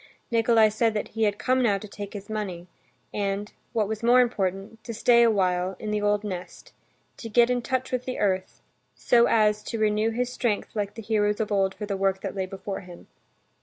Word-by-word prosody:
Nikolay 225 -1 +4
said 220 +1 +1
that 210 - -2
he 225 0 0
had 205 -1 0
come 255 0 +1
now 210 -5 +3
to 215 - -9
take 205 0 -7
this 200 -1 -8
money 200 -5 -4 0.5
and, 200 0 -2 0.2
what 220 -3 0
was 220 +1 -4
more 240 +2 +5
important, 210 -2 -1
to 230 - -6
stay 235 +1 +5
a 235 - +6
while 185 -2 +1
in 210 +1 -5
the 210 0 0
old 205 0 +1
nest, 180 -4 -7 0.4
to 230 - -7
get 240 +2 +4
in 245 -1 0
touch 260 +1 -2
with 255 -1 -2
the 255 - -4
earth, 190 -2 -1 0.3
so 235 0 +4
as 210 -1 +3
to 225 +2 -5
renew 215 0 +2
his 250 +2 -2
strength 230 -2 -2
like 205 -1 -2
the 225 - -8
heroes 210 0 +1
of 220 -1 -2
old 195 -1 +1
for 210 +2 -5
the 200 -1 -3
work 195 0 0
that - - -4
lay 190 -1 -3
before 195 +1 -6
him. 180 -3 -13
210 Hz, 215 wpm, -26 LUFS, 195-230 Hz, 0.5 s, a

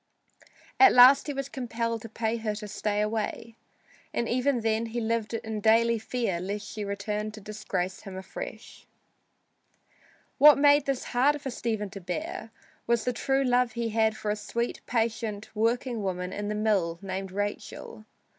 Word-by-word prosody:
At 395 -1 +8
last 255 +4 +8
he 290 - -2
was 275 -1 -3
compelled 230 -3 -3
to 225 - -9
pay 225 +1 -1
her 220 -2 -2
to 210 0 -7
stay 205 +1 -1
away, 220 +1 -3 0.6
and 235 - 0
even 255 +1 +1
then 225 +1 0
he 230 +2 -3
lived 230 0 -1
in 220 -1 -4
daily 230 +1 +4
fear 220 -6 -2
lest 205 +3 -4
she 210 - -5
return 210 +1 -3
to 215 - -9
disgrace 195 -3 -4
him 195 -3 -8
afresh. 190 - -8 1.5
What 295 +2 +9
made 290 0 +5
this 270 -2 -1
harder 275 +5 +2
for 270 -2 -6
Stephen 220 -4 -3
to 195 -1 -8
bear 180 +5 -5 0.4
was 235 -1 +1
the 250 - 0
true 270 +3 +1
love 250 -2 +2
he 235 -1 -2
had 220 0 +1
for 210 - -2
a - - 0
sweet, 235 +3 -3
patient, 225 -2 -2
working 230 +1 0
woman 180 -2 -3
in 205 0 -4
the 210 - -2
mill 200 -6 +1
named 190 0 -4
Rachel. 205 +2 -5
220 Hz, 165 wpm, -28 LUFS, 210-240 Hz, 1.5 s, What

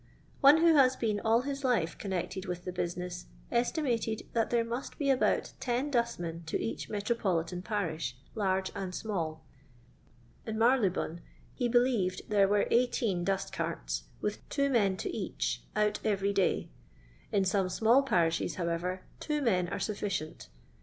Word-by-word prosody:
One 285 +2 +8
who 335 -1 +6
has 265 -3 +5
been 215 -3 0
all 225 +2 +3
his 275 +1 -4
life 215 -11 +1
connected 190 -1 -3
with 180 0 -4
the 180 - -3
business 180 0 -4 0.2
estimated 235 -3 0
that 230 -1 +1
there 235 -1 +2
must 240 +3 -5
be 280 -2 +2
about 260 - +1
ten 255 +4 -1
dustmen 175 -10 -1
to - - -1
each 115 - -4
metropolitan 190 -5 -1
parish, 165 - -2 0.2
large 190 -3 0
and 185 -2 -4
small. 160 -7 -3 1.0
In 220 -1 -4
Marylebone 215 -8 +2 0.3
he 245 -2 -1
believed 235 -7 +2
there 200 -2 +5
were 205 +1 +3
eighteen 230 -6 +2
dustcarts, - - -2 0.2
with 210 0 -2
two 280 -1 +1
men 200 -6 +3
to - - -4
each, - - -2
out 210 0 +2
every 200 -1 +1
day; 195 -2 +1 0.6
in 200 -2 +2
some 190 0 +1
small 225 +7 +4
parishes, 170 -10 +1
however, 180 +1 -2 0.2
two 300 -1 -1
men 185 -10 +2
are - - -3
sufficient. 195 -6 -3
205 Hz, 145 wpm, -31 LUFS, 180-235 Hz, 1.0 s, One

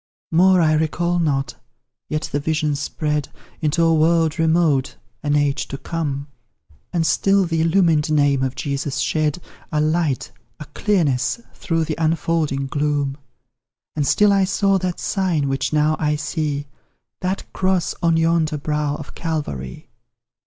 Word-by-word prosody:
More 180 +2 +5
I 155 -1 +3
recall 170 +3 0
not, 140 -4 -1 0.5
yet 155 0 -2
the 145 - 0
vision 155 0 0
spread 150 0 -2 0.3
Into 155 +2 +1
a 165 0 +4
world 160 0 +2
remote, 160 -4 +2 0.3
an 145 -1 0
age 145 -1 +1
to 135 - -6
come 140 -3 -3 0.7
And 165 -2 0
still 195 +3 +3
the 165 -2 0
illumined 165 -3 +3
name 145 -3 +3
of 130 0 -1
Jesus 140 0 -3
shed 150 +4 0 0.3
A 155 - +1
light, 155 -2 0 0.3
a 150 - -7
clearness, 150 - 0
through 165 -2 -1
the 155 0 -4
unfolding 155 -3 0
gloom 145 -1 -1 0.8
And 145 -2 0
still 210 -1 +4
I 195 -1 +3
saw 195 +1 +2
that 180 -1 -3
sign, 180 -8 0
which 135 0 -1
now 155 0 +2
I 150 -1 +1
see, 150 -2 -2 0.5
That 185 +1 -2
cross 185 -2 0
on 165 -1 +3
yonder 165 -1 +2
brow 150 0 -1
of 150 - -9
Calvary. 145 - -4
155 Hz, 145 wpm, -21 LUFS, 145-170 Hz, 0.8 s, More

